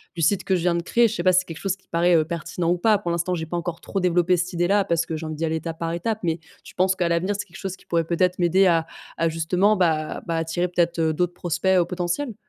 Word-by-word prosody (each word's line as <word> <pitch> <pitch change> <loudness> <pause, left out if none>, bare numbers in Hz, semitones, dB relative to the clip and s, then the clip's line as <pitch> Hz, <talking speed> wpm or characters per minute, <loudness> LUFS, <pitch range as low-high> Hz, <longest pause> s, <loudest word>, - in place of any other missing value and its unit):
du 165 - -2
site 190 +3 +2
que 190 - +1
je 175 - -1
viens 175 0 +2
de 170 - 0
créer. 235 +7 +3
Je 220 - -4
sais 175 - -2
pas 185 - +4
si 180 - +6
c'est - - -14
quelque 165 - -8
chose 195 -1 -1
qui 190 - -32
paraît, 170 +1 +3
heu, 155 -1 +3
pertinent 170 +1 -2
ou 180 - +1
pas? 215 +3 +4
Pour 175 -4 -3
l'instant, 170 +2 -1
j'ai 160 -2 -4
pas 175 +2 -4
encore 170 -1 -4
trop 195 - -3
développé 180 0 +2
cette 180 +1 -2
idée-là 185 +4 +2
parce 170 -3 0
que 160 - -4
j'ai 160 +1 -5
envie 155 - -4
d'y 160 +2 -2
aller 160 0 -1
étape 160 +1 -6
par 165 0 -3
étape 215 +6 -2
mais, 165 0 0 0.2
tu - - -13
penses 185 +1 +2
qu'à 180 -2 0
l'avenir, 175 +4 0
c'est - - -4
quelque 175 - -14
chose 190 -2 -4
qui - - -23
pourrait 165 -1 0
peut-être 180 +2 +1
m'aider 180 +2 +4
à 165 -2 +3 0.3
à 165 - +1
justement 180 +6 +2
bah 160 -5 0
bah, 165 -1 -1
attirer 165 +2 -1
peut-être, 175 -1 0
heu, 160 -1 +1
d'autres 175 +2 -1
prospects, 175 +2 0
heu, 175 - +3
potentiels? 180 +8 -3
175 Hz, 300 wpm, -23 LUFS, 165-185 Hz, 0.3 s, si